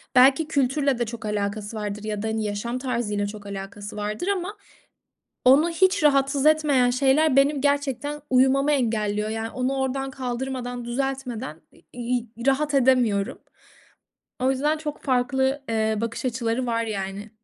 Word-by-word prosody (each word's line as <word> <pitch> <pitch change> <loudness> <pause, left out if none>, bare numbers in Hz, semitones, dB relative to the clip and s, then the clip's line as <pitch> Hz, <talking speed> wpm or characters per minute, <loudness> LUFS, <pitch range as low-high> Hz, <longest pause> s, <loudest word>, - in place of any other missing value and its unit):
Belki 270 +5 +6
kültürle 275 -2 +1
de 240 - +1
çok 230 0 -7
alakası 210 +1 -3
vardır 210 0 -4
ya 210 -1 -3
da, - - -1
hani, 220 0 -1
yaşam 210 +4 -3
tarzıyla 230 -6 -1
çok 205 0 -9
alakası 200 +1 -7
vardır 210 - -3
ama 400 +1 -2 0.9
onu 280 +7 +6
hiç 370 -1 +2
rahatsız 275 0 +3
etmeyen 295 -5 +4
şeyler 270 +3 +3
benim 275 +1 +4
gerçekten 285 0 -1
uyumamı 265 +3 +4
engelliyor, 215 -5 0
yani, 225 +1 -3
onu 255 +2 -1
oradan 270 0 -1
kaldırmadan, 250 -1 -4
düzeltmeden, 250 - -3
i - - -21
iii, 245 0 -2 0.2
rahat 290 +2 +2
edemiyorum. 245 -7 +2 1.0
O 260 - +3
yüzden 295 +4 +1
çok 300 -1 -6
farklı, 265 +1 +1
eee, 220 -1 +1
bakış 230 +2 -4
açıları 240 0 -1
var, 230 -1 0
yani. 200 -1 -5
250 Hz, 145 wpm, -24 LUFS, 220-275 Hz, 1.0 s, Belki